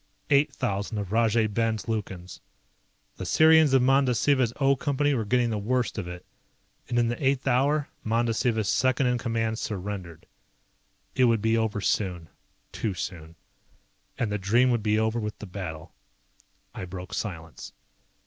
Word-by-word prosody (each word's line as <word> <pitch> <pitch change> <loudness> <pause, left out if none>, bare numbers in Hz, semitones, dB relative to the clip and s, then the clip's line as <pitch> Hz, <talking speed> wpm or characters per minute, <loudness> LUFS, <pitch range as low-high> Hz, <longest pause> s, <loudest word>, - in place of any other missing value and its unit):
Eight 140 +1 +4
thousand 100 -2 -3
of 100 -2 -4
Rajay 115 0 +3
Ben's 110 -1 -1
Lukans. 95 -5 -5 0.8
The - - -5
Sirians 160 -3 +5
of 130 - +4
Mandasiva's 130 -1 +3
O 140 0 +4
Company 145 +2 0
were 115 -5 -1
getting 120 +2 +1
the 105 - -1
worst 120 +2 -1
of 90 - -5
it, 90 0 -8 0.6
and 120 - -1
in 120 -1 +3
the 120 +5 -3
eighth 135 0 +1
hour 140 +4 +2 0.2
Mandasiva's 115 -1 0
second 130 +1 +2
in 125 -1 +1
command 115 -1 -1
surrendered. 95 -5 -5 0.9
It 130 - +3
would 115 -2 +3
be 110 +2 +1
over 110 -2 0
soon, 90 -5 -1 0.4
too 105 -4 -3
soon. 85 -2 -6 0.8
And 110 -3 -1
the 105 - -1
dream 120 +7 +3
would 120 -2 +1
be 105 0 +1
over 110 +1 0
with 105 -1 -4
the - - -8
battle. 90 -5 -7 0.8
I - - -6
broke 90 +1 -8
silence. 85 -7 -6
110 Hz, 155 wpm, -26 LUFS, 100-125 Hz, 0.9 s, Sirians